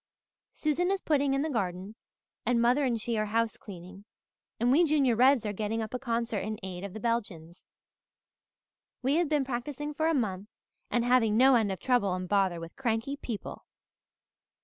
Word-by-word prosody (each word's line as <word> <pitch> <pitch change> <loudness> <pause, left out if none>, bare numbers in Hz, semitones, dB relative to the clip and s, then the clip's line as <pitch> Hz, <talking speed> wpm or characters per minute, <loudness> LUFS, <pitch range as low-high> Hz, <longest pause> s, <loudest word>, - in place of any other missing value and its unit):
Susan 315 +4 0
is 390 0 +1
putting 285 -5 +1
in 275 - 0
the 315 - -2
garden, 190 -3 -3 0.5
and 245 -1 +1
mother 245 +5 +3
and 240 -4 0
she 225 0 -1
are 215 - 0
housecleaning, 205 -4 -4 0.6
and 240 +2 +2
we 310 +6 +5
Junior 285 -7 +3
Reds 250 0 +4
are 210 - -2
getting 215 +2 -2
up 220 0 -4
a 250 - -2
concert 235 -4 -1
in 215 +2 -4
aid 185 -1 -6
of 200 -2 -6
the 220 - -6
Belgians. 200 -8 -3 1.4
We 275 +4 +2
have 340 -3 +1
been 295 -3 +1
practising 275 +4 -4
for 315 +2 0
a 325 - +2
month 200 -6 -2 0.4
and 240 -1 +1
having 235 -4 +3
no 265 +2 +6
end 220 -5 +3
of 190 - -4
trouble 220 -8 +1
and 185 0 -5
bother 190 -3 +1
with 165 0 -9
cranky 235 +1 -1
people. 235 -7 -7
235 Hz, 180 wpm, -29 LUFS, 205-270 Hz, 1.4 s, no